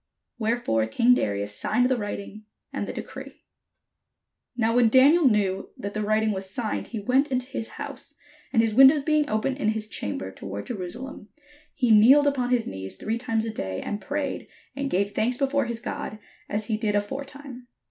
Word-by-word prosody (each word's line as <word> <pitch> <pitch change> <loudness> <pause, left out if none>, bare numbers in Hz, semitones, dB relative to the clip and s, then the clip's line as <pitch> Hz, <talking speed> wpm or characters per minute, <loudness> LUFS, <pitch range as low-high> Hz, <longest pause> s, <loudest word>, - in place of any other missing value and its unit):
Wherefore 220 - 0
king 235 - +4
Darius 100 - -1
signed 245 0 +1
the 260 - +2
writing 210 -1 -6 0.3
and - - -3
the - - -3
decree. - - -9 1.1
Now 230 0 +1
when 240 -2 +5
Daniel 285 +7 +6
knew 195 -3 0
that 200 +1 -5
the 215 - -2
writing 215 +1 +1
was 190 -1 -3
signed, 220 +2 -3
he 235 - -6
went 265 +7 +1
into 255 -1 0
his 230 -3 -5
house; - - -7 0.4
and 225 -3 +4
his 225 -1 0
windows 270 +4 +7
being 305 0 +2
open 220 +5 0
in 270 -6 -2
his 215 0 0
chamber 100 - -4
toward 100 +1 -7
Jerusalem, 225 +3 -7 0.5
he 245 -4 +2
kneeled 250 +7 +7
upon 265 -4 +1
his 245 -2 +2
knees 95 0 -6
three 225 +2 -3
times 225 -3 -1
a 225 - -3
day, 95 - -4
and 205 - -4
prayed, 285 -1 -3 0.3
and 275 0 -2
gave 200 0 0
thanks 235 +4 0
before 275 0 +1
his 235 -1 -4
God, 215 - -5 0.3
as 210 +1 -1
he 215 -1 -1
did 215 -2 0
aforetime. 270 +3 -5
225 Hz, 180 wpm, -25 LUFS, 205-260 Hz, 1.1 s, windows